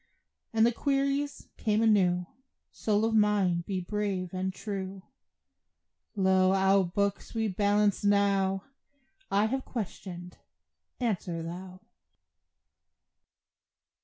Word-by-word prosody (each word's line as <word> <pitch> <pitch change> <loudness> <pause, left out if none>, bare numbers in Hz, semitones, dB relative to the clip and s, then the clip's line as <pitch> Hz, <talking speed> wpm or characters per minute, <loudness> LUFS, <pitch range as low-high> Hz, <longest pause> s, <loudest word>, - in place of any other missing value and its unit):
And 225 0 +4
the 240 - +4
queries 280 +2 -1 0.2
come 215 0 +2
anew: 180 -5 +3 0.5
Soul 215 0 0
of 225 - 0
mine, 205 -5 +3
be 190 -2 -1
brave 190 -1 -3
and 185 +1 -1
true; 195 -1 -6 1.1
Lo! 190 -1 +3
our 195 0 +4
books 200 +5 -2
we 220 -1 +1
balance 205 +1 +2
now; 200 -1 +2 0.7
I 200 +2 +3
have 260 +4 -1
questioned; 180 -5 -7 0.6
answer 180 -8 -2
thou. 180 +2 -8
200 Hz, 100 wpm, -29 LUFS, 185-215 Hz, 1.1 s, And